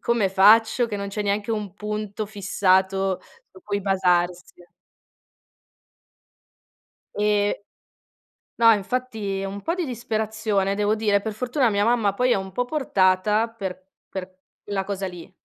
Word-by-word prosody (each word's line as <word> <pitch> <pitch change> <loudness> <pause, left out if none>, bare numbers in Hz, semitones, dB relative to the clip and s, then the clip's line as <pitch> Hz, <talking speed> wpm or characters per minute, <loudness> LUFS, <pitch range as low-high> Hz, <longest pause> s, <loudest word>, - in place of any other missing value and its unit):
"Come 235 -5 +1
faccio 220 +5 +5
che 210 -3 -4
non 200 0 -4
c'è 210 +1 -3
neanche 205 +2 -1
un 210 -4 -3
punto 210 0 -4
fissato 190 -2 +1 0.3
su 375 - -16
cui 200 -8 -2
basarsi?" 180 -2 0 2.5
E 205 -1 +1 0.9
no, 230 -1 +6
infatti 210 -2 -3
e - - -3
un 200 +1 -6
po' 330 - -1
di 360 -3 -2
disperazione 220 -4 -1
devo 210 +1 +1
dire, 205 -2 +1
per 220 0 -4
fortuna 250 +2 +1
mia 205 0 +1
mamma 230 -4 +2
poi 250 +3 +1
è - - +5
un 190 0 -4
po' 245 +6 -1
portata 210 -6 +2
per 190 -5 -7 0.2
per 185 -1 -7 0.3
la 195 -1 -1
cosa 195 -1 -4
lì 180 +1 -10
205 Hz, 140 wpm, -24 LUFS, 195-220 Hz, 2.5 s, no